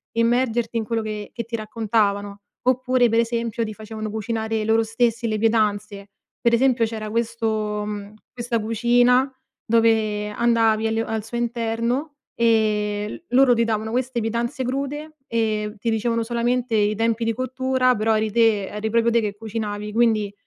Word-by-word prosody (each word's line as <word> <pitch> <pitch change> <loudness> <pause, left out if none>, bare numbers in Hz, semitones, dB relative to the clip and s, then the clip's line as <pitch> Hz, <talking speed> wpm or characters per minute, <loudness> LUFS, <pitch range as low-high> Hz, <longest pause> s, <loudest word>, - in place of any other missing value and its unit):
immergerti 235 0 +1
in 220 - -1
quello 230 0 -1
che 210 -1 -5
che 235 +1 -4
ti 230 +1 -5
raccontavano. 210 -2 -1 0.3
Oppure 255 -1 +3
pre 225 - +2
esempio 230 -1 -1
ti 215 - -6
facevano 215 0 -6
cucinare 220 0 -2
loro 225 +1 +3
stessi 230 +1 0
le 215 -1 -1
pietanze. 210 -2 0 0.3
Pre 235 0 +4
esempio 245 -2 +3
c'era 215 -1 -5
questo, 220 -2 -1
mhmm, 205 0 -6 0.2
questa 240 -1 -2
cucina 245 +4 +3 0.3
dove 220 -2 +2
andavi 225 -1 +2
al 225 0 0
al 220 -1 -3
suo 235 +2 -5
interno, 235 +5 -1 0.2
ehm, 210 0 +1
loro 255 0 +5
ti 235 0 +2
davano 220 0 -2
queste 250 0 -1
pietanze 235 +4 -2
crude, 285 +4 -4
ehm, 215 -2 -1
ti 230 +3 -1
dicevano 230 +1 0
solamente 240 +1 -1
i 210 0 +2
tempi 230 +1 0
di 225 0 +1
cottura 255 0 +1
però 220 +1 +1
eri 215 -1 -1
te 220 -3 +3
eri 210 +1 -3
proprio 230 +1 +2
te 235 - +4
che 205 -1 -3
cucinavi. 210 -1 -4
Quindi, 220 -3 +2
225 Hz, 160 wpm, -22 LUFS, 215-235 Hz, 0.3 s, loro